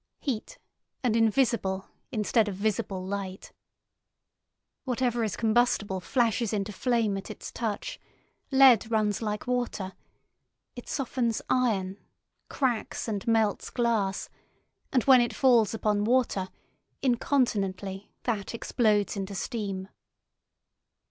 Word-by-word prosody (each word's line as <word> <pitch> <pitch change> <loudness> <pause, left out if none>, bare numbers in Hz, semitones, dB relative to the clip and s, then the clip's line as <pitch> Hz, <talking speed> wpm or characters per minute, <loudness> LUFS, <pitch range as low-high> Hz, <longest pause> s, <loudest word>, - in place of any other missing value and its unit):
Heat, 270 - -4 0.5
and 235 -3 +2
invisible, 225 -4 +2 0.3
instead 220 -1 +2
of 200 - -3
visible, 195 -2 -2
light. 190 -1 -5 1.3
Whatever 245 -2 0
is 215 -3 -1
combustible 220 -4 +2
flashes 230 +1 +1
into 205 0 -1
flame 230 -3 +1
at 195 - -7
its - - -8
touch, 230 - -4 0.5
lead 265 -5 +6
runs 215 -2 +1
like 210 -1 -3
water, 245 -6 -2 0.8
it 245 - -9
softens 245 -4 -1
iron, 205 -6 +1 0.5
cracks 245 -5 -1
and 205 -2 -3
melts 220 -3 +2
glass, 225 -5 0 0.6
and 255 -4 +2
when 260 -2 +7
it 240 -2 -1
falls 240 -6 +4
upon 210 -2 0
water, 230 -6 +1 0.5
incontinently 205 -7 0
that 225 -2 -2
explodes 215 -3 +1
into 200 0 -4
steam. 195 -2 -3
220 Hz, 110 wpm, -28 LUFS, 200-245 Hz, 1.3 s, when